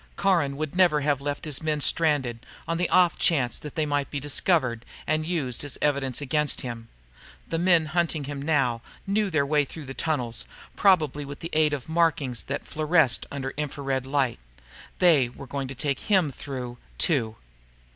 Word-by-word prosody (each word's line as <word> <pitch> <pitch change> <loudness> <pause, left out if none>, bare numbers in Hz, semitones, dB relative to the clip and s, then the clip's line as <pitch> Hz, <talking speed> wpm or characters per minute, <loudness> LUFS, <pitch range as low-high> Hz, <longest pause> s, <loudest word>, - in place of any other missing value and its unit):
Caron 165 -8 +1
would 155 +1 -4
never 175 -5 +4
have 145 -1 +1
left 145 +2 -3
his 150 -4 +1
men 155 -1 0
stranded, 145 -7 +2 0.2
on 165 +1 -1
the 180 - +1
off 180 -2 +4
chance 130 -9 +2
that 150 - -9
they 155 - +1
might 145 -1 -1
be 145 - -3
discovered 135 -4 +1 0.2
and 155 +1 0
used 145 -9 -2
in 145 - -5
evidence 140 -3 0
against 150 +1 0
him. 115 -2 -6 0.6
The 165 - -1
men 175 -2 +4
now 155 - -7
hunting 170 -3 0
him 140 -4 0 0.2
knew 205 +1 +1
their 155 -5 +1
way 150 +1 +2
through 150 +2 -8
the 135 - -7
tunnels, 130 -7 -2 0.3
probably 155 -7 +3
with 140 0 -9
the 165 - -6
aid 155 -1 +3
of 140 -4 -4
markings 160 -7 +1
that 140 - -4
fluoresced 155 -4 +2
under 135 -1 -4
infra 150 -1 -4
red 135 -1 -1
light. 135 -3 0 0.6
They 155 -9 +5
were 135 - -11
going 135 0 -4
to 135 - -7
take 140 +1 -1
him 190 -8 +2
through, 125 -2 -7 0.2
too. 115 -9 +1
145 Hz, 180 wpm, -26 LUFS, 135-160 Hz, 0.6 s, They